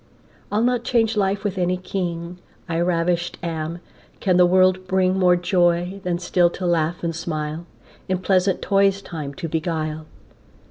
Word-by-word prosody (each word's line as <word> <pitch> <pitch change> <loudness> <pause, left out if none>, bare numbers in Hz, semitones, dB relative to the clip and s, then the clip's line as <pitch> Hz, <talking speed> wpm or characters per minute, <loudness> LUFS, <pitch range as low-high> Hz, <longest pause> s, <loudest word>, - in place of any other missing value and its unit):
I'll 210 +2 +1
not 245 -1 +1
change 225 -3 +1
life 195 -1 0
with 200 -2 -2
any 180 0 +1
king, 180 -1 -4 0.3
I 165 -1 -1
ravisht 175 0 0
am: 165 0 -4 0.4
can 185 -2 +2
the 180 -1 +6
world 185 0 +3
bring 185 0 +2
More 180 -2 +4
joy, 175 +1 +1
than 180 -1 -1
still 175 0 +2
to 185 - -4
laugh 170 0 0
and 165 -1 -2
smile, 155 0 -4 0.4
In 185 - +1
pleasant 185 0 +1
toys 195 0 +2
time 150 -6 -6
to 170 - -4
beguile? 155 -1 -3
180 Hz, 155 wpm, -22 LUFS, 170-190 Hz, 0.4 s, the